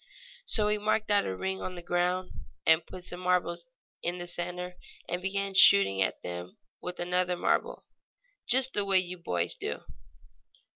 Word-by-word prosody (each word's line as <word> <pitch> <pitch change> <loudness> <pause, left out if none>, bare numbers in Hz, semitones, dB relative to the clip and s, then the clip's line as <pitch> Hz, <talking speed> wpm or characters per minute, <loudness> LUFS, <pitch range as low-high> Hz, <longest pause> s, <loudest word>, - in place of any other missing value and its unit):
So 210 - +1
he 210 0 +1
marked 215 0 0
out 205 0 +3
a 95 - -3
ring 190 - -3
on 185 - -5
the 175 - -8
ground, 180 +1 0 0.3
and 160 +1 +5
putting 180 -1 -10
some 180 - -4
marbles 180 -2 0 0.3
in 175 +1 -1
the 175 - -5
center 180 +1 -4 0.3
began 195 +3 -2
shooting 95 - +6
at 95 - -1
them 90 0 -7 0.2
with 180 0 -6
another 180 0 0
marble, - - 0 0.6
just 260 +1 +4
the 205 - +2
way 195 -1 +3
you 180 -1 -1
boys 90 - 0
do. - - -4
180 Hz, 160 wpm, -29 LUFS, 175-190 Hz, 0.6 s, shooting